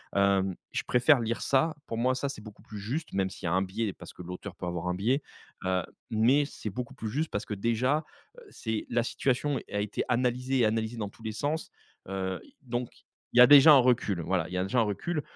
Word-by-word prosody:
Hem, 95 -2 +2 0.2
je - - -2
préfère 125 +2 +5
lire 115 0 -2
ça 150 +4 +2
pour 115 - -4
moi, 130 +2 +2
ça 140 +1 -2
c'est 135 - -7
beaucoup 105 -1 -12
plus 105 -2 -9
juste, 135 +11 -4
même 95 -1 0
s'il 90 - -6
y - - +1
a - - 0
un 95 - +3
biais, 95 +2 -2
parce - - -12
que - - -11
l'auteur 90 +2 -7
peut 90 - -6
avoir 90 0 -3
un 90 - 0
biais, 125 +9 +1 0.4
heu, 95 -1 +1 0.3
mais 125 +7 +3
c'est 110 -6 -6
beaucoup 120 +5 -6
plus 110 - -5
juste 155 +7 -1
parce 105 - -3
que 105 - -4
déjà, 125 +9 0 0.3
heu, - - -12
c'est 110 -2 -4
la 120 0 +1
situation 135 +3 0
a 105 - -1
été 105 0 -2
analysée 125 +1 +1
et 115 - +5
analysée 110 +1 0
dans 105 -2 -3
tous 115 - -18
les 110 - -3
sens. 150 +7 -2 0.4
Heu, 95 -1 -3 0.2
donc 120 -2 -3 0.4
il 125 - +4
y - - +11
a 125 - +10
déjà 145 +2 +9
un - - +9
recul, 115 -8 +2
voilà, 90 0 0
il 90 - -10
y - - -1
a 90 - +1
déjà 120 +6 +1
un - - +5
recul, 150 - -2
115 Hz, 240 wpm, -29 LUFS, 100-130 Hz, 0.4 s, y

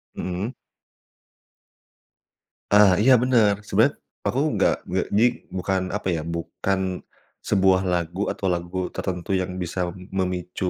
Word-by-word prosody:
Mhm. 95 +7 -3 2.2
Ah, 105 -2 +7
iya 130 +3 +6
bener. 110 -4 +2
Sebenarnya - - +2 0.2
aku - - -1
nggak - - +3
nggak - - -1
jadi 110 +4 +4 0.3
bukan 95 0 0
apa, 105 -1 -3
ya, 80 - -1
bukan 90 +3 -2 0.4
sebuah 95 -2 +3
lagu 90 +1 -1
atau - - -4
lagu 85 +1 -4
tertentu 95 +1 -3
yang 90 -1 -1
bisa 90 0 -2 0.2
memicu, 90 -1 -2
95 Hz, 120 wpm, -24 LUFS, 90-100 Hz, 2.2 s, Ah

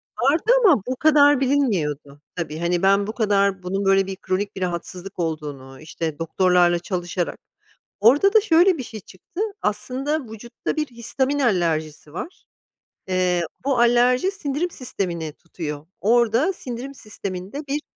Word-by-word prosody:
Vardı 310 - +2
ama, 295 - +6
bu 255 - -1
kadar 290 -1 +5
bilinmiyordu. 165 - 0
Tabii, 160 -3 -4
hani, 175 0 0
ben 200 +1 +4
bu 215 - -4
kadar, 200 -4 +1
bunun 195 +2 -2
böyle 195 0 +3
bir 190 - -4
kronik 200 +3 -3
bir 190 - -7
rahatsızlık 180 +1 -5
olduğunu, 145 -5 -4
işte, 155 -1 -5
doktorlarla 175 +1 +3
çalışarak 175 -1 -3 0.6
Orada 290 - +5
da 440 - +6
şöyle 355 -2 +4
bir - - -3
şey 220 -2 -8
çıktı. 200 - -9 0.2
Aslında 265 +7 -2
vücutta 235 +2 -5
bir 305 - +1
histamin 260 +4 -2
alerjisi 160 - 0
var. 335 - -8 0.6
Eee, 180 -2 +1 0.2
bu 275 -2 +1
alerji 245 +7 +4
sindirim 330 -1 -2
sistemini 175 - -4
tutuyor. 155 -3 -7
Orada 235 - +3
sindirim 260 -4 -7
sisteminde, 205 +4 -7
bir 290 +2 -1
200 Hz, 140 wpm, -22 LUFS, 175-270 Hz, 0.6 s, ama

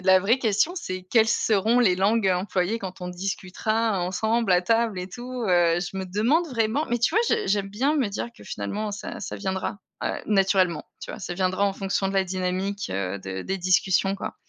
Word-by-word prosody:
la 190 0 +6
vraie 210 +7 +2
question 225 - +2
c'est 185 - -5
quelles 225 +1 +4
seront 220 +2 +2
les 215 -7 +4
langues 200 +3 +2
employées 185 +3 0
quand 185 -1 -7
on 180 - -5
discutera 195 +3 -1
ensemble 220 +5 0
à 180 -1 +5
table 225 +1 +1
et 180 0 -5
tout, 245 +4 -6
heu. 175 -2 +4
Je 185 +1 -5
me 190 - -2
demande 235 - +1
vraiment 235 +3 0
mais 240 - +1
tu 235 - +1
vois, 440 - +5
j'ai 455 -1 +1
j'aime 200 -1 +1
bien 260 +10 0
me 260 -8 +1
dire 205 +4 -4
que - - -14
finalement 205 - -4
ça 205 - -6
ça - - -5
viendra, 190 +1 -3 0.2
heu, - - 0 0.2
naturellement, 190 -4 +2 0.2
tu - - -7
vois? - - -8
Ça - - -4
viendra 185 +2 +1
en 200 - +1
fonction 195 0 -1
de 195 - -4
la 195 -1 +3
dynamique, 185 - -2
heu, 95 0 -3
de 95 0 -5
des 190 - -2
discussions, 185 +1 +2
quoi. - - -5
195 Hz, 210 wpm, -25 LUFS, 185-225 Hz, 0.2 s, la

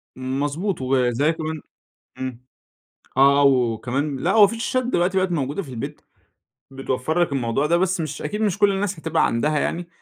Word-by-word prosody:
مضبوط، 145 +8 -2
وزي 130 +2 +2
كمان 160 -1 -5 0.6
امم، 130 -2 -6 0.7
آه 140 +1 +5
وكمان 130 +2 +1
لأ 170 +8 0
هو 215 -2 +7
في 210 - -4
شاشات 255 +2 0
دلوقتي 190 -5 +1
بقِت 185 -1 0
موجودة 145 +3 -2
في 155 - -12
البيت 120 -3 -6 0.7
بتوفر 135 +4 -2
لك 165 - 0
الموضوع 130 +1 0
ده، 170 +3 +3
بس 185 0 0
مش 155 -3 -4
أكيد 210 - -3
مش 210 -5 0
كل 205 -1 +4
الناس 195 -2 -2
هتبقى 160 0 +1
عندها 150 +6 0
يعني، 175 +4 -2
150 Hz, 170 wpm, -22 LUFS, 130-175 Hz, 0.7 s, هو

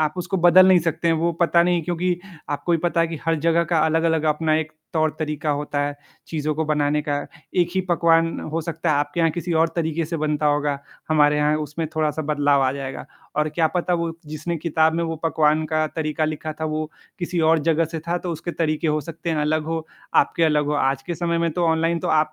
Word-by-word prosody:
आप 155 -1 +1
उसको 180 +2 -2
बदल 180 +1 +7
नहीं 185 -1 +7
सकते 170 +1 -1
हैं, 165 - +4
वो 170 +2 0
पता 170 0 +4
नहीं 175 -1 +1
क्योंकि 175 +1 -1 0.3
आपको 145 +4 -1
भी 165 - +3
पता 170 +1 0
है 165 - +2
कि 165 - -5
हर 165 0 +2
जगह 170 +2 +2
का 165 - +4
अलग-अलग 160 0 +1
अपना 155 0 +1
एक 160 0 -3 0.2
तौर-तरीक़ा 155 -1 -1
होता 145 0 -2
है, 145 0 -2 0.3
चीज़ों 155 -1 -2
को 160 +2 -1
बनाने 150 0 +1
का। 145 - +1 0.4
एक 175 -2 +3
ही 190 - +2
पकवान 165 -1 +3
हो 165 - 0
सकता 165 0 -2
है 150 - +3
आपके 145 +3 -1
यहाँ 165 -1 +3
किसी 175 +1 -3
और 165 - +2
तरीक़े 165 0 -1
से 165 +2 -4
बनता 150 -1 0
होगा, 145 -1 +1 0.3
हमारे 150 -1 +4
यहाँ 150 +1 +2
उसमें 155 +2 -3
थोड़ा-सा 155 0 0
बदलाव 145 -2 +2
आ 130 - +2
जाएगा, 135 -1 -6 0.3
और 150 0 +2
क्या 160 +1 +1
पता 180 0 +1
वो 170 -1 -1 0.2
जिसने 155 +3 -4
किताब 160 0 +1
में 170 - 0
वो 165 0 -3
पकवान 155 -1 +2
का 155 0 0
तरीक़ा 155 0 -1
लिखा 155 0 -3
था, - - -1
वो 155 0 -3 0.3
किसी 175 -1 -2
और 165 - +4
जगह 165 0 +3
से 165 - -2
था 175 +1 +1
तो 175 - -5
उसके 165 +2 -5
तरीक़े 160 -1 -1
हो 155 0 +1
सकते 165 +3 -6
हैं 160 - 0
अलग 155 +1 0
हो, 160 0 -3 0.3
आपके 170 - +3
अलग 150 -2 +2
हो। 150 - 0 0.2
आज 135 0 -4
के 170 - -4
समय 170 0 -1
में 170 0 +1
तो 175 +2 0
ऑनलाइन 165 +1 +1
तो - - -3
आप 155 0 +2
160 Hz, 235 wpm, -22 LUFS, 150-170 Hz, 0.4 s, बदल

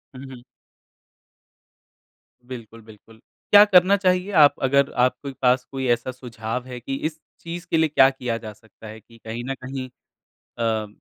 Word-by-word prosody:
हुँ, 130 - -9
हुँ। 120 -1 -13 2.0
बिल्कुल, 115 -3 -10
बिल्कुल। 110 +1 -18 0.3
क्या 205 0 +9
करना 190 0 +5
चाहिए 185 +1 0
आप 145 - +5
अगर 140 +1 +2
आपके 130 +3 0
पास 125 0 +3
कोई 135 -1 -3
ऐसा 120 +2 -7
सुझाव 125 -1 -6
है 125 -1 -7
कि 135 +3 -5
इस 160 0 -21 0.2
चीज़ 170 +1 -7
के 165 - +3
लिए 160 -1 +2
क्या 135 -2 +5
किया 125 -3 -4
जा 110 -2 -9
सकता 110 +1 -17
है? 110 +1 -10
कि 115 +2 -20
कहीं 115 +2 -6
न - - -1
कहीं 130 0 -6 0.7
अ, 110 -2 -1
130 Hz, 165 wpm, -22 LUFS, 115-140 Hz, 2.0 s, क्या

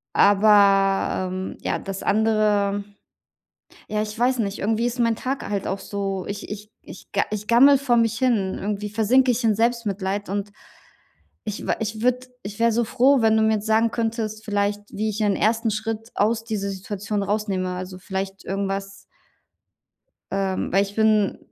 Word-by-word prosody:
Aber, 195 -2 +4
ähm, 185 0 -5
ja, - - -1
das 195 -1 -6
andere 210 -2 +2 1.1
ja, 210 0 -1
ich 215 +1 -6
weiß 255 +1 +2
nicht, 200 -2 -2
irgendwie 225 +3 0
ist 245 +1 -2
mein 230 -1 +2
Tag 265 +4 -4
halt 200 -2 -2
auch 195 - -2
so 195 -2 -4
ich 200 0 -6 0.3
ich - - -12
ga - - +2
ich 210 0 -4
gammele 270 +4 +6
vor 255 -3 +1
mich 225 -1 +2
hin. 220 -7 +1
Irgendwie 210 +1 -3
versinke 245 +5 +3
ich 245 +1 0
in 220 - +4
Selbstmitleid 205 -3 -1
und 200 +1 -3 0.9
ich 210 - -5
wa - - +2
ich 215 0 -3
würde 250 +1 +1
ich 205 0 -8
wäre 230 0 +4
so 235 +1 +1
froh, 260 +2 +3
wenn 220 0 +4
du 220 - +3
mir 220 0 +3
jetzt 210 - -4
sagen 220 +1 +2
könntest 220 -2 -3
vielleicht, 205 -1 0
wie 215 +1 -1
ich 215 +1 -4
ein 200 -2 +2
1. 225 +1 +1
Schritt 225 +2 -4
aus 225 +2 +1
dieser 205 -3 -3
Situation 200 +1 -4
rausnehme. 195 -3 -1
Also, 185 0 -6
vielleicht 195 +1 -5
irgendwas 195 0 -3 1.4
ähm, 195 -1 -1
weil 195 +1 +4
ich 200 0 -8
bin 215 -2 +2
210 Hz, 170 wpm, -23 LUFS, 200-225 Hz, 1.4 s, gammele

